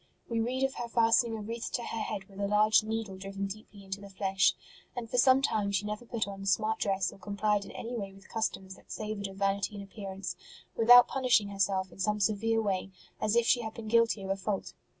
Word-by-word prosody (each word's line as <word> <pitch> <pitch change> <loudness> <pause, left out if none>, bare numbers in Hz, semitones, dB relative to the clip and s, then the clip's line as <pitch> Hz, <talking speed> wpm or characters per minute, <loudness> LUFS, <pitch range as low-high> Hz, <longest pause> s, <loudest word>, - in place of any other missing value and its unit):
We 230 -1 -1
read 250 +4 -1
of 270 0 +1
her 240 - -3
fastening 230 0 +3
a 215 - -6
wreath 230 +2 -5
to 240 - -1
her 225 - -4
head 200 -2 -3
with 195 0 -14
a 200 - 0
large 215 +2 +5
needle 220 -3 -3
driven 195 +1 -5
deeply 200 0 -9
into 195 +1 -6
the 200 - -10
flesh; 195 0 +2 0.4
and 240 -2 -4
for 245 - 0
some 260 +1 +5
time 210 -6 +1
she 200 +1 0
never 210 +3 -4
put 225 -3 -2
on 195 -1 -7
a 195 - -6
smart 220 +3 +1
dress 195 -2 0
or - - -16
complied 205 +1 0
in - - -10
any 240 +2 -5
way 200 -4 -4
with 195 0 -17
customs 195 -4 -3
that - - -17
savoured 210 -2 -4
of 195 - -10
vanity 195 +1 0
in 200 - -6
appearance 195 -2 -6 0.4
without 245 +2 +8
punishing 245 -6 +2
herself 195 -2 0
in - - -15
some 210 +2 0
severe 220 +2 +1
way, 195 -2 -1 0.3
as 215 - +1
if 235 -1 +4
she 240 - +4
had 220 -1 -6
been 225 -1 -7
guilty 230 -2 +3
of 190 - -3
a - - +1
fault. 195 +1 -3
210 Hz, 235 wpm, -30 LUFS, 195-225 Hz, 0.4 s, without